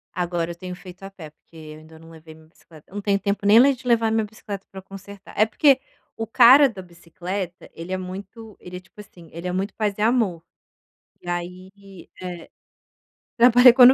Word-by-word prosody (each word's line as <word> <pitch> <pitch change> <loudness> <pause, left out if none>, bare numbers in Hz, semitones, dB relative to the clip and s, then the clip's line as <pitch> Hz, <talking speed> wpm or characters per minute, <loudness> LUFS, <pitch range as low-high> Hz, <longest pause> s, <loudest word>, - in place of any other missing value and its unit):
Agora 175 -1 -2
eu - - -8
tenho 180 +1 -8
feito 180 0 -14
a 195 - -7
pé, 165 -6 -12
porque 160 - -28
eu 155 -1 -11
ainda 160 +1 -16
não 165 +1 -16
levei 160 -1 -14
minha 160 0 -20
bicicleta. 160 +1 -20
Não 205 - -5
tenho 200 -1 +1
tempo 200 0 -3
nem 240 +7 +6
de 250 -1 -12
levar 230 -2 +2
minha 220 0 +1
bicicleta 205 -2 -9
pra 195 - -9
consertar. 195 +1 -13
É 215 - +4
porque 270 +3 +3 0.3
o 225 - -5
cara 260 +5 +7
da 195 -5 -10
bicicleta, 175 +1 -7
ele 165 +3 -9
é 185 - -1
muito 195 +4 -9
ele 180 0 -9
é - - -8
tipo 190 +3 -15
assim, 175 -5 -17
ele 170 +2 -6
é - - -2
muito 190 +2 -3
paz 210 -2 -2
e - - -5
amor. 220 -8 +1 0.8
E 175 - -11
aí 185 +2 -8
É, 180 -2 -8 0.9
trabalha 245 +1 +7
quando 250 0 +8
190 Hz, 200 wpm, -22 LUFS, 175-215 Hz, 0.9 s, quando